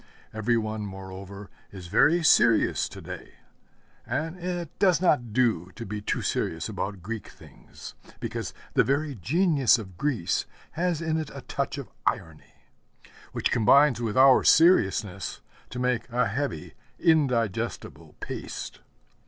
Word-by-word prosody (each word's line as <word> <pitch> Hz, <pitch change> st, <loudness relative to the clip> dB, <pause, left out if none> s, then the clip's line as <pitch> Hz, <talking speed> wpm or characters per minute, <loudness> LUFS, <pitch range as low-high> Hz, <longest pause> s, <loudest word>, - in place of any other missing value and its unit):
Every 110 Hz, +2 st, +1 dB
one, 110 Hz, -1 st, -3 dB
moreover, 95 Hz, 0 st, -9 dB, 0.2 s
is 95 Hz, -3 st, -10 dB
very 150 Hz, -, +3 dB
serious 115 Hz, -7 st, +4 dB
to -, -, -10 dB
day; -, -, -9 dB, 0.7 s
and 160 Hz, +3 st, -3 dB
it 175 Hz, -2 st, -4 dB
does 185 Hz, -6 st, +4 dB
not 145 Hz, -10 st, +2 dB
do 110 Hz, -7 st, +1 dB
to 115 Hz, -, -7 dB
be 105 Hz, +1 st, -5 dB
too -, -, -2 dB
serious 80 Hz, 0 st, -2 dB
about 100 Hz, -3 st, -5 dB
Greek 110 Hz, 0 st, -5 dB
things, -, -, -13 dB, 0.3 s
because -, -, -4 dB, 0.2 s
the -, -, +4 dB
very 145 Hz, +2 st, 0 dB
genius 140 Hz, -, +3 dB
of 95 Hz, -6 st, -10 dB
Greece 130 Hz, -12 st, -1 dB, 0.2 s
has 170 Hz, -1 st, -1 dB
in 160 Hz, -1 st, 0 dB
it 155 Hz, -2 st, -5 dB
a 135 Hz, -, -7 dB
touch 140 Hz, +2 st, -3 dB
of 140 Hz, -, -8 dB, 0.2 s
irony, 80 Hz, -2 st, -4 dB, 0.7 s
which -, -, -1 dB
combines 125 Hz, +3 st, +4 dB
with 115 Hz, -1 st, -2 dB
our 130 Hz, 0 st, +7 dB
seriousness 100 Hz, -, +3 dB, 0.3 s
to -, -, -8 dB
make 125 Hz, -1 st, -1 dB
a 125 Hz, +1 st, +1 dB
heavy, 115 Hz, -, -4 dB, 0.2 s
indigestible 130 Hz, -, 0 dB
paste. -, -, -6 dB
120 Hz, 135 wpm, -26 LUFS, 105-150 Hz, 0.7 s, our